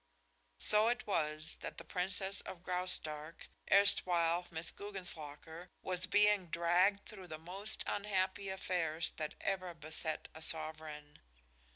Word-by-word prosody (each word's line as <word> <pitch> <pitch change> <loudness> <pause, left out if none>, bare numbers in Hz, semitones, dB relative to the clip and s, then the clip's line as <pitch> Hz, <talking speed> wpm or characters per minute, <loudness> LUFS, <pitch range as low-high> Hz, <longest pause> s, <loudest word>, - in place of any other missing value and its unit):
So 210 - +6
it 245 +1 0
was 155 -5 -1
that - - -7
the - - -7
Princess 190 +2 -2
of 175 -1 -9
Graustark, 165 -4 -3 0.2
erstwhile 175 -3 +4
Miss 165 0 0
Guggenslocker, 175 -4 -5
was 185 0 0
being 205 -1 +4
dragged 175 +5 +2
through 195 -4 -10
the 155 -2 -6
most 190 +6 -4
unhappy 195 -1 -1
affairs 170 -4 -1
that 155 -2 -4
ever 185 -3 -2
beset 155 0 -2
a 160 - -10
sovereign. 155 -2 -1
180 Hz, 125 wpm, -35 LUFS, 160-195 Hz, 0.2 s, So